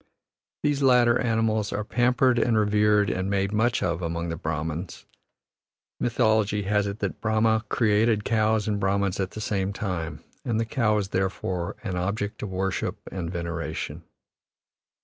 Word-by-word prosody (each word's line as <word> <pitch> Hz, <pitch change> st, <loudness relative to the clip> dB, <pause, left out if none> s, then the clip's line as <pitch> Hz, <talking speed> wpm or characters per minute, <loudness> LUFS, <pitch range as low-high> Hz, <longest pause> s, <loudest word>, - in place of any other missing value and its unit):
These 145 Hz, -1 st, +1 dB
latter 125 Hz, -3 st, +5 dB
animals 110 Hz, -3 st, +1 dB
are 105 Hz, +2 st, -2 dB
pampered 125 Hz, +2 st, +2 dB
and 115 Hz, -2 st, +2 dB
revered 105 Hz, 0 st, +3 dB
and 95 Hz, +1 st, -2 dB
made 100 Hz, 0 st, 0 dB
much 120 Hz, +4 st, +1 dB
of 85 Hz, -1 st, -1 dB
among 85 Hz, 0 st, -2 dB
the 80 Hz, -, -2 dB
Brahmans; 80 Hz, +2 st, -4 dB, 0.9 s
mythology 110 Hz, -3 st, +2 dB
has 105 Hz, +1 st, +1 dB
it 100 Hz, +1 st, -4 dB
that -, -, -3 dB
Brahma 110 Hz, 0 st, +2 dB
created 110 Hz, -1 st, +2 dB
cows 110 Hz, -1 st, +1 dB
and 105 Hz, -1 st, 0 dB
Brahmans 100 Hz, -1 st, 0 dB
at 95 Hz, -1 st, 0 dB
the 110 Hz, -, -7 dB
same 100 Hz, -2 st, -1 dB
time, 90 Hz, -6 st, -4 dB, 0.2 s
and 115 Hz, -3 st, 0 dB
the 115 Hz, -, +1 dB
cow 110 Hz, -2 st, +1 dB
is 100 Hz, -2 st, -2 dB
therefore 95 Hz, -2 st, -2 dB
an 95 Hz, -4 st, -3 dB
object 100 Hz, +4 st, -2 dB
of 105 Hz, -, -4 dB
worship 95 Hz, +1 st, -2 dB
and 85 Hz, -3 st, -4 dB
veneration. 85 Hz, -2 st, -4 dB
105 Hz, 150 wpm, -26 LUFS, 95-110 Hz, 0.9 s, latter